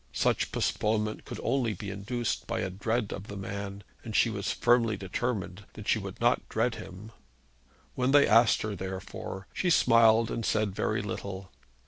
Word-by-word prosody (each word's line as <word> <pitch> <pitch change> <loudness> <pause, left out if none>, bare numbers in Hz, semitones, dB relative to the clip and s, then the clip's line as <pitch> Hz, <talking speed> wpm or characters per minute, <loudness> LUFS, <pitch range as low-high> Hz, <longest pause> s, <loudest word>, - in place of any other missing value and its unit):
Such - - +1
postponement 105 0 -1
could - - -7
only 120 -3 +1
be 100 +2 -6
induced 115 +4 -3
by - - -1
a 95 - -2
dread 110 +3 -1
of 100 - -7
the 100 - -7
man, 100 0 -5 0.2
and 110 -3 -6
she 115 - +4
was 100 -2 -2
firmly 120 -3 +3
determined 100 0 -3
that 105 - -9
she 110 - +3
would 95 -2 -7
not 120 +1 +2
dread 115 +2 +1
him. 100 +3 -9 0.8
When 125 0 0
they 145 +1 +6
asked 115 +1 +5
her, 105 -1 -3
therefore, 95 0 -6
she 180 - 0
smiled 115 -7 +5
and 115 - -2
said 105 -2 +1
very 105 +1 -1
little. 95 -1 -6
105 Hz, 170 wpm, -29 LUFS, 100-115 Hz, 0.8 s, they